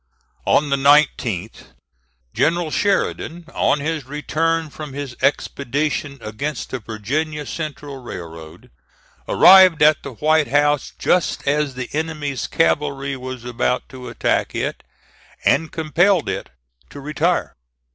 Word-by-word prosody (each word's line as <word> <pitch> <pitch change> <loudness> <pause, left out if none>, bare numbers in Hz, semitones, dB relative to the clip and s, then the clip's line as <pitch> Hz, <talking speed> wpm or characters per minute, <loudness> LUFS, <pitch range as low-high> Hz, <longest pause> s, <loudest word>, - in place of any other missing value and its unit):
On 145 -1 +3
the 140 - +3
19th, 130 - +1 0.6
General 165 0 +1
Sheridan, 175 -3 -1
on 140 - +1
his 155 -2 -2
return 160 +2 -1
from 150 -2 -8
his 140 -3 -6
expedition 140 +1 -1
against 115 +7 -5
the 130 - -3
Virginia 145 +8 -3
Central 145 -2 -6
Railroad, 80 -7 -10 0.6
arrived 185 -5 +7
at 150 0 +5
the 140 - -8
White 155 +4 +2
House 145 +2 +1
just 180 -5 0
as 145 -1 +1
the 130 -1 -4
enemy's 150 -4 -3
cavalry 140 -3 0
was 130 -2 -7
about 125 +1 -1
to 130 -1 -9
attack - - -1
it, - - -3 0.6
and 160 +2 +2
compelled 165 +3 +2
it - - -4 0.4
to 145 - -10
retire. 155 +5 -1
145 Hz, 120 wpm, -20 LUFS, 130-155 Hz, 0.6 s, arrived